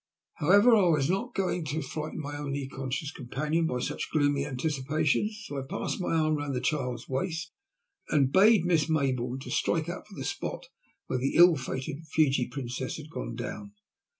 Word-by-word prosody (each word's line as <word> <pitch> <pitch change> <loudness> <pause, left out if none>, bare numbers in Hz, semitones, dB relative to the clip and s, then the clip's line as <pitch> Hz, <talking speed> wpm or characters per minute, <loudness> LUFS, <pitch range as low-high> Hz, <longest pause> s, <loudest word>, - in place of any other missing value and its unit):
However, 205 +9 +6
I 200 -4 +4
was 155 -2 +3
not 235 +6 -2
going 185 -3 0
to 155 +2 -2
frighten 155 +1 -5
my 145 0 -5
only 140 -2 -3
conscious 135 +3 -4
companion 150 +5 -1
by 125 - -1
such - - -3
gloomy 145 -2 +2
anticipations, 150 - 0
so 145 - -4
I - - -3
passed - - -3
my 175 - 0
arm 155 -1 +2
round 145 -2 -3
the - - 0
child's 125 -3 -2
waist 160 +6 -2 0.6
and 140 -3 +3
bade 200 -1 +6
Miss 165 -4 +2
Maybourne 130 -4 0
strike 165 0 0
out 175 - -6
for 200 - -13
the - - -5
spot - - -4 0.4
where 130 - -1
the 135 +2 -1
ill 175 0 +8
fated 135 +2 -4
Fiji 140 -6 +2
Princess 130 -2 -4
had 155 0 -10
gone 120 -6 -5
down. 105 -3 -6
150 Hz, 180 wpm, -29 LUFS, 135-165 Hz, 0.6 s, ill